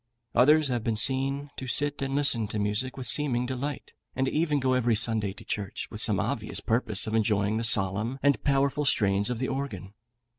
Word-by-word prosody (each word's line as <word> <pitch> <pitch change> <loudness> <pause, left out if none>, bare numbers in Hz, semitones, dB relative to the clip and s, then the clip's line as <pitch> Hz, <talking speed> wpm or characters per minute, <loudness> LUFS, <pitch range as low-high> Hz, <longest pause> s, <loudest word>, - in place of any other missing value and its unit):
Others 150 +3 +4
have 120 -3 -2
been 115 -1 -1
seen 135 +5 +1
to 130 - -6
sit 145 +3 +2
and 135 0 -2
listen 130 -6 +2
to 110 - -5
music 105 +6 -1
with 130 -2 -6
seeming 125 -3 +1
delight, 130 +2 -5 0.2
and 130 0 0
even 150 0 0
to - - -7
go 130 -1 +2
every 120 -3 +2
Sunday 110 -2 0
to - - -14
church, 100 -2 -4
with - - -1
the - - +2
obvious - - -2
purpose 110 -3 0
of 110 - -4
enjoying 105 -1 +1
the 115 - -2
solemn 110 +3 +1
and 140 -1 +2
powerful 140 +1 +1
strains 100 -6 +2
of 125 - -2
the 130 +2 -2
organ. 120 -9 -5
125 Hz, 200 wpm, -27 LUFS, 110-140 Hz, 0.2 s, Others